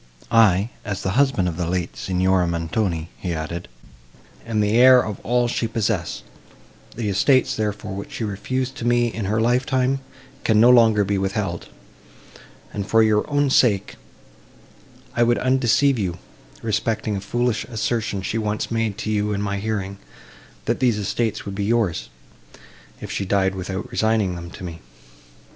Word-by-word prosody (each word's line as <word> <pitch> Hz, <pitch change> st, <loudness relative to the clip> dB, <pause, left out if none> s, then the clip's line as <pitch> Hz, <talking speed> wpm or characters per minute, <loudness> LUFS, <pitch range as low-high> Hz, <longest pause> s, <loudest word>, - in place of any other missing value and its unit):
"I, 110 Hz, -1 st, +4 dB
as 100 Hz, -2 st, -4 dB
the 95 Hz, -, 0 dB
husband 130 Hz, -6 st, +2 dB
of 85 Hz, -2 st, -3 dB
the 85 Hz, -2 st, -2 dB
late 90 Hz, -1 st, -2 dB
Signora 95 Hz, -1 st, +1 dB
Montoni," 85 Hz, 0 st, -2 dB
he 90 Hz, -3 st, -3 dB
added, 85 Hz, +3 st, -5 dB, 0.8 s
"am 110 Hz, -2 st, -1 dB
the 105 Hz, 0 st, +2 dB
heir 130 Hz, +1 st, +8 dB
of 105 Hz, -2 st, -5 dB
all 120 Hz, +1 st, +2 dB
she 115 Hz, -1 st, -1 dB
possessed; 110 Hz, -6 st, -2 dB, 0.7 s
the 115 Hz, -2 st, -3 dB
estates, 130 Hz, +7 st, +3 dB
therefore, 105 Hz, -1 st, -3 dB
which 100 Hz, +1 st, -7 dB
she -, -, -4 dB
refused 130 Hz, +6 st, -2 dB
to 115 Hz, -, -5 dB
me 120 Hz, -1 st, +2 dB
in 110 Hz, -2 st, -3 dB
her 105 Hz, +3 st, 0 dB
life 120 Hz, +3 st, +2 dB
time, 130 Hz, 0 st, +1 dB, 0.4 s
can 110 Hz, -2 st, +3 dB
no 120 Hz, +3 st, +7 dB
longer 110 Hz, -4 st, +5 dB
be 100 Hz, 0 st, 0 dB
withheld, 95 Hz, -3 st, -2 dB, 1.1 s
and, 100 Hz, -1 st, -4 dB
for 115 Hz, 0 st, +4 dB
your 105 Hz, -1 st, +2 dB
own 145 Hz, -1 st, +1 dB
sake, 105 Hz, -8 st, +3 dB, 1.2 s
I 120 Hz, -, +1 dB
would 120 Hz, 0 st, +4 dB
undeceive 130 Hz, 0 st, +2 dB
you, 90 Hz, -4 st, -2 dB, 0.5 s
respecting 110 Hz, -1 st, -1 dB
a 95 Hz, -, -3 dB
foolish 115 Hz, +2 st, -1 dB
assertion 110 Hz, -3 st, -2 dB
she 115 Hz, +4 st, -2 dB
once 105 Hz, 0 st, -2 dB
made 115 Hz, -3 st, -1 dB
to 110 Hz, 0 st, -3 dB
you 105 Hz, 0 st, 0 dB
in 100 Hz, -, -2 dB
my 100 Hz, -1 st, -2 dB
hearing—that 100 Hz, -2 st, -6 dB
these 120 Hz, -4 st, +2 dB
estates 105 Hz, +2 st, -2 dB
would 100 Hz, -, -5 dB
be 100 Hz, 0 st, -2 dB
yours, 100 Hz, -, 0 dB, 0.9 s
if -, -, -7 dB
she -, -, -2 dB
died 95 Hz, 0 st, +1 dB
without 95 Hz, 0 st, -5 dB
resigning 110 Hz, -4 st, +1 dB
them 85 Hz, 0 st, -7 dB
to 95 Hz, -, -11 dB
me. 85 Hz, -2 st, -7 dB
105 Hz, 160 wpm, -22 LUFS, 95-115 Hz, 1.2 s, heir